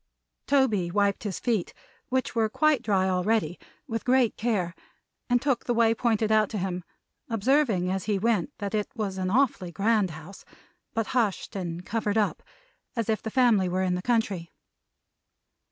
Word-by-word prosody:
Toby 225 -11 +2
wiped 200 +2 +1
his 195 -3 -3
feet 225 -8 -1 0.3
(which 260 -1 0
were 225 -2 +1
quite 305 +1 +2
dry 195 -5 +1
already) 185 -1 0 0.3
with 225 -1 -3
great 250 -2 +3
care, 205 -7 -1 0.6
and 245 0 +4
took 270 -2 0
the 240 - 0
way 225 -1 +4
pointed 220 -2 +1
out 215 -1 +4
to 215 - -4
him, 180 -2 -3 0.5
observing 225 -5 +2
as 190 0 -2
he 210 -2 +1
went 225 +4 +1
that 200 -1 -4
it 210 -1 -1
was 200 -4 -3
an 185 0 -1
awfully 220 -6 +1
grand 205 +2 +2
house, 160 +4 -10 0.5
but 225 -1 +1
hushed 225 -4 0
and 175 -2 -4
covered 220 -1 -1
up, 210 -2 +1 0.5
as 230 -2 -2
if 220 - +1
the 220 - -4
family 220 -7 +3
were 185 +1 0
in 185 -1 +1
the 180 - -2
country. 200 -7 0
215 Hz, 170 wpm, -27 LUFS, 185-230 Hz, 0.6 s, and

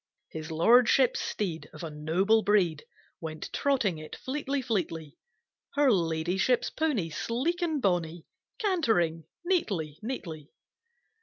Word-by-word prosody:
His 160 0 -7
Lordship's 235 +9 +4
Steed 175 -6 -3
Of - - -9
a 160 - -5
noble 175 +9 +2
breed 190 -7 +2 0.3
Went 155 -1 -6
trotting 230 - +1
it 155 - -8
fleetly, 280 +1 -2
fleetly, 165 - -2 0.6
Her 285 -2 +5
Ladyship's 180 +6 +1
pony, 260 - 0
Sleek 260 - -1
and 320 -4 0
bonny 175 -6 0 0.3
Cantering 225 - +1 0.2
neatly, 190 - -1
neatly. 170 - -6
190 Hz, 110 wpm, -29 LUFS, 160-255 Hz, 0.6 s, Her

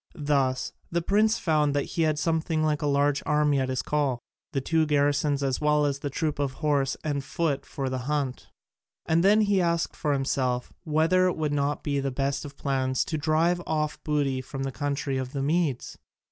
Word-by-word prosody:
Thus 140 -4 0 0.2
the 170 0 0
prince 215 +4 +3
found 150 -7 +1
that 145 - +2
he 170 - 0
had 155 -2 +2
something 160 0 0
like 150 -1 +1
a 150 - 0
large 140 0 +2
army 150 -1 +2
at 130 -1 -1
his 130 -1 -1
call: 145 -4 0 0.3
the 135 - 0
two 160 +3 +1
garrisons 145 -1 +2
as 135 0 -1
well 150 0 +3
as 140 -1 -1
the 145 - -3
troop 150 +1 -2
of 140 -2 -1
horse 140 -2 0
and 145 -2 -2
foot 150 0 -2
for 135 -3 -4
the 130 0 -2
hunt. 135 0 -2 0.6
And 165 +1 +2
then 210 +3 +5
he 200 -2 +2
asked 170 -1 0
himself 135 -3 -1
whether 165 +4 +3
it 180 - -1
would 155 -2 -1
not 145 0 -1
be 145 -1 0
the 135 0 -1
best 140 +2 -2
of 145 -1 -10
plans 130 -2 0
to 155 - -2
drive 165 +3 +2
off 155 -1 -2
booty 140 -4 0
from 135 +1 -6
the 135 - -2
country 140 0 -2
of 130 0 -5
the 135 -1 -2
Medes? 150 -4 -1
145 Hz, 200 wpm, -26 LUFS, 135-155 Hz, 0.6 s, then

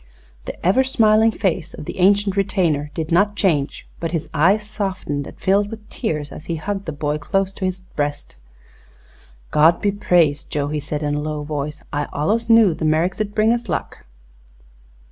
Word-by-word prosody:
The - - -8
ever 195 +9 +4
smiling 220 -3 +4
face 175 -5 -2
of - - -8
the - - -7
ancient 200 +1 +3
retainer 170 -7 0
did 160 0 -3
not 200 +4 +3
change, 155 -9 0
but 165 0 -3
his 165 -2 -2
eyes 190 +8 +3
softened 190 -9 -3
and - - -12
filled 200 +2 +2
with 220 -1 -9
tears 150 - -3
as 155 - -10
he 170 - -2
hugged 200 +5 -4
the 160 - -3
boy 150 0 -2
close 195 +5 -1
to 190 - -4
his 185 0 -2
breast. 145 - -4 1.1
"God 160 +3 +5
be 205 - +1
praised. 175 -7 +2
Joe!" 145 -1 -1
he 150 0 -2
said 150 +1 -4
in 145 0 0
a 145 - -1
low 150 0 -3
voice. 150 0 -4
"I 145 0 -1
allus 220 +10 0
knew 225 -6 +6
the 160 - -6
Merricks 160 +5 +1
'd 205 -1 -3
bring 220 +2 +4
us 240 0 -4
luck." - - -4
175 Hz, 185 wpm, -21 LUFS, 150-205 Hz, 1.1 s, knew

